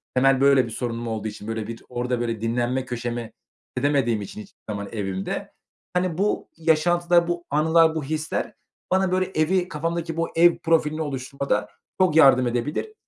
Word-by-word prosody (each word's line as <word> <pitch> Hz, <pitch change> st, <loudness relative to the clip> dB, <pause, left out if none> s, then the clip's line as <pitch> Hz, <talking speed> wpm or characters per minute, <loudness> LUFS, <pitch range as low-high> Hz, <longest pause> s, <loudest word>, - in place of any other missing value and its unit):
temel, 135 Hz, +1 st, +4 dB
böyle, 140 Hz, -2 st, +5 dB
bir 115 Hz, -, -8 dB
sorunum 120 Hz, 0 st, -4 dB
olduğu 110 Hz, -1 st, -3 dB
için, 105 Hz, 0 st, -8 dB
böyle, 110 Hz, -1 st, -3 dB
bir 115 Hz, 0 st, -8 dB
orada, 125 Hz, 0 st, -2 dB
böyle, 115 Hz, -2 st, -2 dB
dinlenme 120 Hz, +3 st, -1 dB
köşeme 120 Hz, -1 st, -4 dB, 0.4 s
edemediğim 135 Hz, -7 st, +1 dB
için 100 Hz, +2 st, -7 dB
hiçbir -, -, -16 dB
zaman 100 Hz, -1 st, -4 dB
evimde, 95 Hz, -3 st, -4 dB, 0.4 s
hani, 180 Hz, -2 st, 0 dB
bu 205 Hz, +2 st, 0 dB
yaşantılar, 170 Hz, +2 st, +3 dB
bu 175 Hz, 0 st, -3 dB
anılar, 160 Hz, +2 st, +4 dB
bu 155 Hz, -, -2 dB
hisler 155 Hz, +2 st, -3 dB, 0.4 s
bana, 190 Hz, -1 st, +2 dB
böyle, 185 Hz, 0 st, +2 dB
evi 180 Hz, +4 st, +2 dB
kafamdaki 165 Hz, +1 st, -3 dB
bu 165 Hz, -, 0 dB
ev 170 Hz, +1 st, +5 dB
profilini 160 Hz, -1 st, +1 dB
oluşturmada 135 Hz, -6 st, -2 dB, 0.3 s
çok 180 Hz, -5 st, +3 dB
yardım 130 Hz, -5 st, +6 dB
edebilir. 145 Hz, -, -2 dB
140 Hz, 160 wpm, -24 LUFS, 120-165 Hz, 0.4 s, yardım